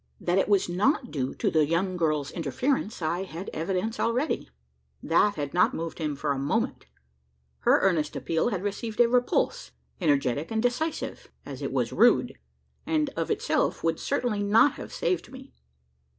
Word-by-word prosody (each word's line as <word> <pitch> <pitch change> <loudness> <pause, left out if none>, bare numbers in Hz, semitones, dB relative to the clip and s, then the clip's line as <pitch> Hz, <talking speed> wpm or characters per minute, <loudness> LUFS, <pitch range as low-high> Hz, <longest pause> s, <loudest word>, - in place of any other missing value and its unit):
That 180 +2 +1
it 195 - 0
was 200 -2 +3
not 240 - +1
due 135 -3 -2
to - - 0
the 155 -1 +4
young 170 +5 0
girl's 155 -4 0
interference, 205 - -2
I 170 +3 0
had 185 0 -6
evidence 185 +7 -2
already. 245 - 0 0.5
That 200 +5 +3
had 145 -2 -4
not 180 - +3
moved 165 +1 -5
him 150 -3 -2
for 140 +1 -2
a 140 - -1
moment. 140 +1 -1 0.7
Her - - +4
earnest 160 -6 +1
appeal 165 +7 0
had 195 -5 -3
received 215 +2 -4
a 240 - +7
repulse 250 - 0 0.3
energetic 145 -2 +1
and 225 - -1
decisive, 245 +8 -2 0.2
as - - -8
it - - -3
was - - -1
rude; - - +4 0.5
and 305 -3 0
of - - -2
itself 440 +3 0
would 165 -1 0
certainly 225 -5 -1
not 215 +7 +5
have, - - -9
saved 370 - -2
me. 265 +1 -12
190 Hz, 165 wpm, -27 LUFS, 160-240 Hz, 0.7 s, a